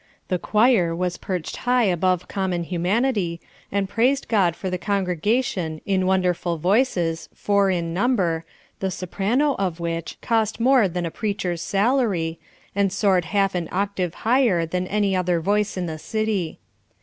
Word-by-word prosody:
The 180 - 0
choir 210 -7 +3
was 180 0 -2
perched 180 -4 -4
high 250 0 +2
above 185 -2 +1
common 185 -3 -1
humanity, 180 +1 0 0.3
and 200 -1 0
praised 255 +7 +1
God 190 -7 +2
for 190 - -5
the 180 -1 -2
congregation 195 - -1
in 190 -2 +1
wonderful 180 -2 +1
voices, 175 - +1
four 200 -1 +2
in 170 -3 -1
number, 185 -6 +1 0.4
the 190 - -1
soprano 210 - 0
of 180 -4 -1
which 165 -1 -4
cost 220 -1 0
more 250 -3 +4
than 175 0 -3
a 165 - -3
preacher's 190 -5 -2
salary, 195 -7 +1 0.4
and 200 -1 +2
soared 195 -3 +2
half 195 +2 +1
an 175 -2 -2
octave 190 -2 -1
higher 230 -8 +3
than 180 +2 -2
any 205 -1 +1
other 180 -2 +1
voice 205 +4 0
in 180 - -1
the 160 -2 -5
city. 215 -4 -2
190 Hz, 150 wpm, -23 LUFS, 175-210 Hz, 0.4 s, more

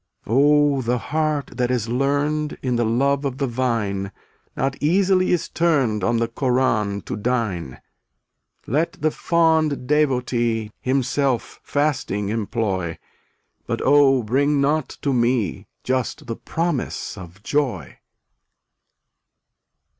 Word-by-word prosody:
278 110 - -3
Oh, 145 -1 +4
the 120 +1 0
heart 150 +2 -1
that 125 -1 +1
is 120 -3 0
learned 145 +4 0
In 125 -2 0
the 120 - +1
love 135 +5 +1
of 135 -2 -2
the 140 - 0
vine 115 -6 -1 0.5
Not 135 0 0
easily 185 +3 +3
is 175 - +1
turned 135 - +1
On 120 +3 +2
the 115 0 +1
Koran 115 -5 0
to - - -5
dine. 105 - -2 0.9
Let 155 +8 0
the 155 +1 0
fond 160 -6 +1
devotee 125 -6 +1
Himself 130 -1 0
fasting 130 -9 -1
employ, 100 -6 -2 0.7
But - - -2
oh 135 -2 +5
bring 140 +6 +2
not 145 0 +1
to 140 - +1
me 120 -3 0 0.2
Just 130 -1 -2
the 115 - -4
promise 165 -6 -3
of 95 0 -12
joy. 120 - -2
130 Hz, 120 wpm, -22 LUFS, 115-145 Hz, 0.9 s, oh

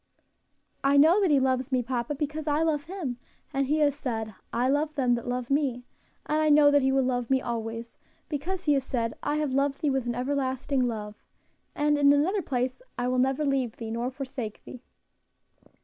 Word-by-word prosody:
"I 280 +1 +4
know 325 +8 +6
that 380 - +3
He 290 -2 +5
loves 260 0 0
me, 255 -1 +1
papa, 245 +3 -2
because 300 +2 -4
I 300 +2 +2
love 300 -3 0
Him, 330 -9 -4 0.4
and 275 0 0
He 300 +3 +2
has 290 -1 +4
said, 225 -6 -4 0.2
'I 245 +2 +1
love 300 +2 0
them 255 -4 +2
that 235 0 -3
love 245 +1 -3
me;' 265 -4 0 0.4
and 305 +1 +1
I 310 - +3
know 295 -1 +6
that 285 0 +4
He 265 0 +2
will 270 0 +3
love 245 -2 -1
me 265 -1 +3
always, 230 -1 -5 0.3
because 345 +5 -3
He 295 - +3
has 275 -2 +1
said, 230 -3 -2
'I 290 - -1
have 300 -3 -1
loved 275 +1 0
thee 295 - +2
with 265 -2 -1
an 240 - -1
everlasting 260 0 0
love,' 210 -2 -6 0.5
and 295 0 +2
in 285 0 +6
another 340 +8 +2
place, 255 - -2 0.2
'I 245 0 0
will 255 0 +1
never 265 +3 +1
leave 265 -5 0
thee, 225 -1 -6
nor 235 +2 -2
forsake 260 -4 -6
thee.'" 250 - -10
270 Hz, 205 wpm, -27 LUFS, 245-295 Hz, 0.5 s, know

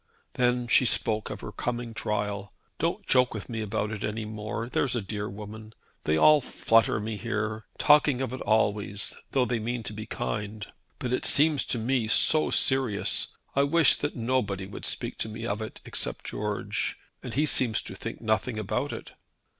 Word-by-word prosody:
Then 125 -1 +1
she 120 +2 +5
spoke 110 -2 +3
of 105 - -6
her 105 - -6
coming 120 +1 -3
trial. 105 -2 -2 0.3
"Don't - - -1
joke 125 -2 +3
with 105 - -6
me 115 -2 -3
about 105 0 -2
it 110 -2 -5
any 110 +1 -2
more, 110 +1 -4
there's 125 0 0
a 120 - 0
dear 105 +1 -4
woman. 110 +2 -9 0.3
They 80 +1 +2
all 150 - +7
flutter 115 -3 +2
me 110 0 -4
here, 110 -1 -3
talking 145 -3 +5
of 130 -2 -2
it 130 - -5
always, 105 -2 +1 0.2
though 130 -3 +3
they 120 -2 -1
mean 120 +2 -3
to 105 - -4
be 110 0 -7
kind. 105 -1 -4 0.3
But 125 -3 -3
it - - 0
seems 150 -1 +4
to - - -1
me 120 0 0
so 155 +7 +4
serious. 130 -6 +2 0.3
I 140 - +4
wish 145 -1 +5
that 145 - -3
nobody 115 -6 -1
would 100 - -7
speak - - -3
to 110 - -2
me 110 +1 -6
of 105 -1 -2
it 110 - -7
except - - -4
George, - - -2 0.2
and - - -6
he 150 +3 +3
seems 125 -7 +3
to - - -7
think - - -6
nothing 110 +1 0
about 105 -3 -2
it." - - -7
110 Hz, 185 wpm, -27 LUFS, 105-125 Hz, 0.3 s, all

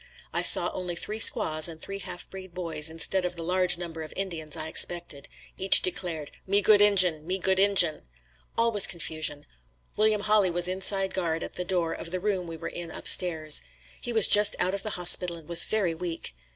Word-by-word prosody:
I - - -1
saw - - +4
only 180 -2 -6
three 215 +5 -4
squaws 155 -6 +5
and 165 -1 -10
three 195 +4 -6
half 180 -2 -9
breed 190 -2 -13
boys, 160 -4 0
instead 165 +3 -3
of 180 0 -4
the 170 - -8
large 180 +1 0
number 165 -2 -9
of 155 - -10
Indians 165 -6 -6
I 155 - -6
expected. 170 -4 -2 0.3
Each 190 +1 +6
declared 170 -4 -5 0.2
"Me 200 +1 +2
good 205 0 +3
Injin! 180 -6 +5
Me 185 +1 -3
good 190 0 0
Injin!" 190 -5 +4 0.6
All 230 0 +1
was 205 -3 +3
confusion. 155 -4 -4 0.5
William 215 0 0
Hawley 210 -2 +1
was 175 0 -2
inside 190 +1 -2
guard 165 -3 -4
at - - -9
the 180 - -6
door 175 -3 -3
of - - -8
the 185 +1 -5
room 190 -2 -4
we 165 -1 -9
were 165 - -8
in 175 -1 -9
upstairs. 160 -2 -1 0.4
He 240 - -5
was 220 -2 +5
just 210 0 +6
out 185 - -2
of 200 - -4
the 215 -3 -5
hospital 175 0 +2
and 160 -2 -16
was 170 0 +6
very 200 -6 -2
weak. 165 - -7
180 Hz, 205 wpm, -25 LUFS, 165-195 Hz, 0.6 s, Each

